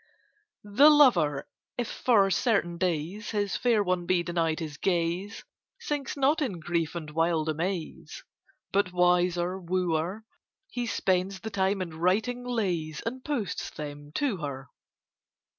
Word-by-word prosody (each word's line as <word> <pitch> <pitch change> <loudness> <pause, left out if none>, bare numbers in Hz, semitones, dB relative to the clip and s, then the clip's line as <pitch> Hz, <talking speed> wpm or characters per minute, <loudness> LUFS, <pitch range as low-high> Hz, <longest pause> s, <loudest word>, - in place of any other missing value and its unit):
The 210 +9 +6
lover, 180 - +4 0.3
if 245 -2 -1
for 200 -6 +3
certain 175 -4 +1
days 180 +4 -2
His 205 -2 -1
fair 230 -4 +2
one 180 -2 -1
be 180 -2 +2
denied 165 -2 0
his 155 -3 -6
gaze, 180 +3 -1 0.4
Sinks 295 -11 -3
not 280 +4 +2
in 210 - -2
grief 165 0 -2
and 155 -3 -5
wild 165 0 +1
amaze, 175 - -4 0.5
But, 195 -2 +1
wiser 180 0 +2
wooer, 180 +2 -1 0.5
He 240 -1 -3
spends 190 -2 0
the 220 - -6
time 190 -1 +1
in 160 -3 -9
writing 220 +8 +1
lays, 180 -11 -2
And 255 +3 -4
posts 245 - -3
them 145 -1 -8
to 265 - 0
her. 140 -4 -6
185 Hz, 135 wpm, -28 LUFS, 165-220 Hz, 0.5 s, The